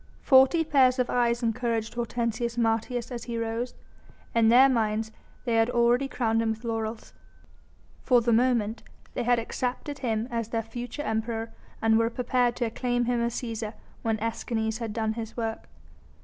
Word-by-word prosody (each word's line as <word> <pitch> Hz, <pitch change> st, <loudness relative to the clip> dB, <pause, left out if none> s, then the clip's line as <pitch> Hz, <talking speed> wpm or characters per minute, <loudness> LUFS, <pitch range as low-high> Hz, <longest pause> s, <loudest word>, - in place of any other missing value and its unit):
Forty 265 Hz, +5 st, +6 dB
pairs 265 Hz, -4 st, +4 dB
of 250 Hz, -1 st, 0 dB
eyes 240 Hz, 0 st, +1 dB
encouraged 230 Hz, -1 st, -1 dB
Hortensius 235 Hz, 0 st, -2 dB
Martius 230 Hz, +2 st, 0 dB
as 240 Hz, -2 st, -5 dB
he 235 Hz, -1 st, -4 dB
rose. 230 Hz, +2 st, -3 dB, 0.6 s
In 230 Hz, -1 st, +4 dB
their 255 Hz, +3 st, +8 dB
minds 220 Hz, -3 st, 0 dB, 0.3 s
they 235 Hz, -2 st, +1 dB
had 225 Hz, +1 st, +3 dB
already 240 Hz, +2 st, +3 dB
crowned 225 Hz, -4 st, 0 dB
him 225 Hz, -, 0 dB
with 220 Hz, +1 st, -3 dB
laurels. 225 Hz, -1 st, -4 dB, 0.9 s
For 250 Hz, -2 st, +4 dB
the 235 Hz, 0 st, +1 dB
moment 235 Hz, -2 st, +2 dB, 0.3 s
they -, -, -2 dB
had 245 Hz, 0 st, +3 dB
accepted 255 Hz, +5 st, -3 dB
him 225 Hz, -3 st, -1 dB
as 230 Hz, -2 st, -2 dB
their 225 Hz, 0 st, -2 dB
future 240 Hz, +6 st, -6 dB
Emperor 225 Hz, 0 st, -2 dB, 0.3 s
and 225 Hz, 0 st, +4 dB
were 230 Hz, 0 st, +2 dB
prepared 245 Hz, 0 st, +1 dB
to 240 Hz, -, -1 dB
acclaim 245 Hz, +1 st, -1 dB
him 240 Hz, 0 st, +1 dB
as 235 Hz, 0 st, -1 dB
Cæsar 225 Hz, -2 st, -4 dB, 0.3 s
when 225 Hz, -1 st, 0 dB
Escanes 225 Hz, 0 st, -2 dB
had 230 Hz, -2 st, -3 dB
done 220 Hz, 0 st, -1 dB
his 225 Hz, 0 st, -7 dB
work. 225 Hz, -1 st, -4 dB
235 Hz, 165 wpm, -27 LUFS, 225-245 Hz, 0.9 s, their